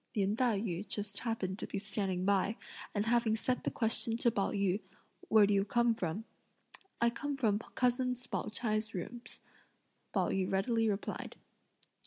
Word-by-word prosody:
Lin 200 0 +2
Tai 235 -3 +2
yü 200 -1 -3
just 205 0 -1
happened 210 -5 -2
to - - -4
be - - -4
standing 195 -2 -2
by, 200 +2 +2 0.4
and 205 +1 +1
having 230 -1 +3
set 250 +3 -1
the - - +1
question 225 0 +2
to 235 0 +3
Pao 200 -3 0
yü 200 0 0 0.5
"Where 215 -2 +7
do 205 - +2
you 195 -1 +3
come 235 +2 +3
from?" 195 +1 -3 0.7
"I 235 0 +4
come 285 +3 -3
from 215 -6 +2
cousin 250 +2 0
Pao 245 0 -4
ch'ai's 215 -1 -1
rooms," 235 +7 -6 0.7
Pao - - +1
yü 190 -1 0
readily 225 +3 +2
replied. 200 0 -3
215 Hz, 165 wpm, -33 LUFS, 200-235 Hz, 0.7 s, Where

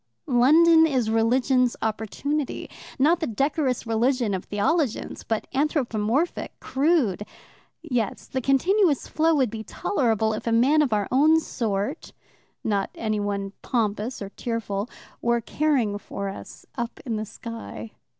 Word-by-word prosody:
London 320 +5 +6
is 250 -7 0
religion's 245 +2 +2
opportunity 225 +7 -2 0.3
not 320 +6 +4
the 320 - -2
decorous 270 +2 0
religion 230 0 +1
of 185 - -3
theologians, 255 +5 -1
but 220 -1 -2
anthropomorphic, 275 -1 0
crude. 270 - +1 0.6
Yes, 235 -5 -2
the 260 - -3
continuous 305 - +2
flow 320 +1 +2
would 260 -7 +2
be 220 -1 -5
tolerable 220 - 0
if 215 - -5
a - - +2
man 265 +7 +4
of 285 -5 +1
our 205 -2 +1
own 310 +5 +5
sort 225 - -3 0.5
not 200 -3 0
anyone 205 -2 -2
pompous 220 0 -1
or 195 - -6
tearful 220 -2 -3 0.3
were 235 0 +2
caring 235 -4 0
for 200 0 -5
us 195 - -10
up 235 0 -4
in 230 -4 -2
the 215 - -2
sky. 230 0 -8
240 Hz, 130 wpm, -25 LUFS, 215-285 Hz, 0.6 s, London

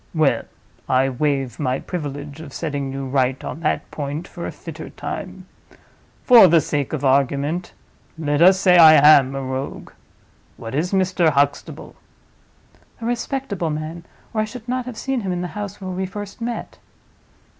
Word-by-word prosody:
Well, 155 -3 +2 0.4
I 130 +1 +3
waive 135 -2 -1
my 130 -3 0
privilege 145 -3 -6
of 145 -4 -10
setting 145 -4 -3
you 135 0 -5
right 130 0 0
on - - -6
that 160 -2 -2
point 145 +2 -5
for - - -7
a - - -5
fitter - - -9
time. - - -7 0.8
For 235 -6 +8
the 170 -1 +5
sake 145 -2 -2
of 145 -3 -3
argument, 140 +5 +1 0.4
let 145 -1 -1
us 185 +2 +6
say 180 -2 +5
I 160 -2 +10
am 140 -2 +6
a 135 - -3
Rogue. 130 +1 -5 0.7
What 115 - -8
is 160 +6 -1
Mr. 185 -3 +2
Huxtable?" 145 -1 -1 1.0
"A 230 - -6
respectable 235 - -2
man, 155 +2 -5 0.3
or 215 - +1
I - - 0
should 225 +2 -10
not 250 0 -2
have 245 -4 -7
seen 270 -2 -2
him 190 -3 -3
in 175 0 -2
the 180 - -4
house 205 -1 -6
where 190 -1 -6
we 185 +1 -3
first 205 +3 -8
met." 235 0 -5
155 Hz, 165 wpm, -21 LUFS, 140-190 Hz, 1.0 s, I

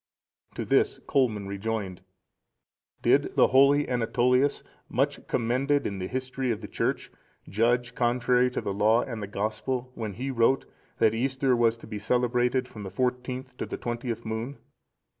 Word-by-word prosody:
To - - -3
this - - +2
Colman 115 -7 0
rejoined: 100 -2 -3 1.0
"Did - - +3
the - - +5
holy 140 +2 +5
Anatolius,(474) 125 +3 +2 0.3
much - - -1
commended 135 +4 +1
in 100 -1 -3
the 95 - -3
history 130 +1 -3
of 115 -2 -1
the 105 - -7
Church, - - -2 0.4
judge 120 +4 +1
contrary 125 +1 +2
to 125 - -3
the 100 - -3
Law 110 +4 +3
and 115 -4 -6
the 100 - -4
Gospel, 120 +5 -3
when 110 -5 -5
he 130 +6 -4
wrote, 130 +2 +2 0.3
that 110 - +4
Easter 130 +2 +1
was 115 -1 +2
to - - -13
be 105 -2 -6
celebrated 125 +3 +1
from 110 -4 -10
the 100 - -5
fourteenth 125 +4 -2
to - - -4
the - - -5
twentieth 120 -1 -4
moon? 110 +5 -4
120 Hz, 160 wpm, -27 LUFS, 110-130 Hz, 1.0 s, the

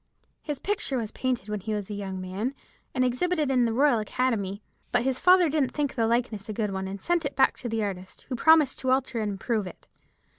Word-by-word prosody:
His 295 -2 -4
picture 400 -5 -2
was 225 -3 -3
painted 250 -6 -2
when 210 0 -3
he 215 +3 -3
was 205 -2 -4
a 210 - -6
young 195 -2 -4
man, 195 +8 -3 0.4
and 255 - +3
exhibited 300 +4 0
in 250 -2 +3
the 230 - +1
Royal 260 0 +3
Academy; 210 -3 -1 0.3
but 245 -1 +2
his 260 0 0
father 365 -1 +6
didn't 290 -3 0
think 290 -2 -1
the 230 -3 +1
likeness 230 -3 -1
a - - -2
good 210 -1 -1
one, 190 0 -3
and 195 +1 -6
sent 345 - 0
it 280 - -3
back 265 - +4
to 245 - -5
the 225 -1 -1
artist, 190 -2 -6
who 260 - -3
promised 310 +1 +5
to 260 - -2
alter 260 -2 +1
and 210 -2 -1
improve 210 0 -1
it. 180 - -12
240 Hz, 230 wpm, -27 LUFS, 205-270 Hz, 0.4 s, father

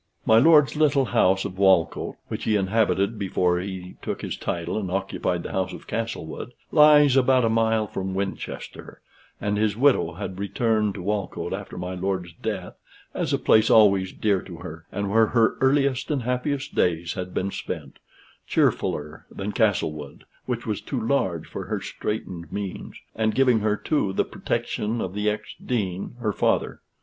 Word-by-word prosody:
My 110 0 +6
lord's 150 +1 +5
little 145 -3 +3
house 95 -2 +2
of 95 -1 -6
Walcote 95 -4 +3
which - - -5
he 110 - +2
inhabited 100 +1 +1
before 90 -2 +1
he 90 -1 -7
took - - -4
his - - -3
title 85 -1 -3
and 95 -4 -4
occupied 95 -2 -2
the - - -6
house 95 -1 -1
of - - -10
Castlewood 115 -1 -5 0.2
lies 150 -3 +7
about 130 -2 +4
a - - +2
mile 110 -1 +2
from 95 -2 -4
Winchester, 95 0 -5 0.4
and 105 0 -1
his 110 -1 +1
widow 125 -11 +3
had 95 +1 -6
returned 105 +1 0
to 95 - -6
Walcote 100 0 -2
after - - -6
my 90 +1 -4
lord's 90 -2 -3
death 100 -5 -4 0.4
as - - -2
a - - +2
place 110 0 +4
always 100 -4 +5
dear 100 -4 +1
to 90 - -10
her, 80 +1 -9
and 100 0 -2
where 110 +1 +5
her 115 -1 +3
earliest 135 -1 +2
and 140 -5 -1
happiest 130 +3 -2
days 85 -1 +1
had 90 -1 -5
been 100 +2 -2
spent, 75 -8 -6 0.5
cheerfuller 75 +1 0
than 100 +2 -5
Castlewood, 80 - -1 0.2
which 120 -2 -3
was 105 -4 -2
too 135 - -3
large 100 - 0
for 95 - -7
her 105 +2 -2
straitened 95 -4 -5
means, 100 -2 -5 0.2
and 110 -1 0
giving 130 -4 +4
her, 105 0 +1
too, 105 -10 0
the - - +1
protection 110 +3 -2
of 95 -4 -3
the 105 +1 0
ex 105 - -4
dean, 100 -3 -2
her 105 -3 0
father. - - 0
105 Hz, 170 wpm, -24 LUFS, 95-115 Hz, 0.5 s, lies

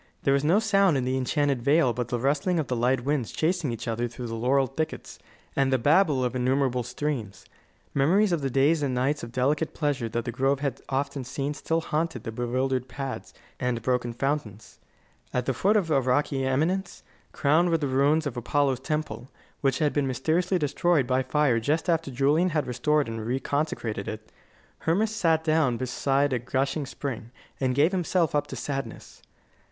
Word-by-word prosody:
There 135 - +3
was 140 0 +2
no 165 +6 +4
sound 200 -7 +3
in 130 - -1
the 130 +1 0
enchanted 135 0 0
vale 140 -1 +3
but 120 0 -3
the 120 - -1
rustling 145 +8 +1
of 155 - 0
the 125 - -2
light 125 +2 +1
winds 140 -5 0
chasing 165 -4 0
each 115 +1 -6
other 115 +1 -1
through 120 +1 -8
the 115 - -5
laurel 130 +4 +2
thickets, 155 +5 -5 0.4
and 135 -1 +2
the 130 - +4
babble 145 +1 +3
of 125 0 -1
innumerable 130 0 +1
streams. 120 -4 -4 0.5
Memories 185 +9 +3
of 170 -3 0
the 135 - -1
days 140 +5 +3
and 135 -3 -1
nights 135 +4 0
of 115 - -7
delicate 145 +5 0
pleasure 145 -6 -1
that 115 +1 -3
the 120 - -2
grove 135 +3 +1
had 140 -2 -3
often 140 0 -2
seen 135 +3 -3
still 165 +2 -1
haunted 160 +1 -2
the 115 - -4
bewildered 125 +2 -1
paths 135 +1 -6 0.3
and 125 -2 -1
broken 125 -1 0
fountains. 120 -4 -3 0.6
At 125 -1 0
the 135 - 0
foot 205 - +2
of 170 -6 0
a 140 -3 +4
rocky 135 +1 +1
eminence, 165 +8 -1 0.3
crowned 160 +5 +2
with 165 -2 +1
the 145 - 0
ruins 140 +4 +2
of 140 -4 -3
Apollo's 135 +2 0
temple, 130 -5 -4 0.3
which 135 -2 +1
had 150 -2 +1
been 145 -2 +1
mysteriously 160 +9 +1
destroyed 155 -1 +1
by 130 +1 +1
fire 135 -3 +2
just 150 +10 0
after 165 -3 +1
Julian 145 +7 +2
had 150 -4 0
restored 150 +3 +1
and 115 0 -4
reconsecrated 125 -4 -2
it, 110 0 -7 0.5
Hermas 210 +7 0
sat 165 -6 +2
down 155 -6 +2
beside 135 +2 0
a 125 - +1
gushing 135 +4 -1
spring, 125 -3 -5 0.3
and 130 -2 0
gave 150 +6 +4
himself 180 -3 +1
up 145 - +1
to - - -7
sadness. 135 -5 -6
135 Hz, 190 wpm, -26 LUFS, 125-155 Hz, 0.6 s, no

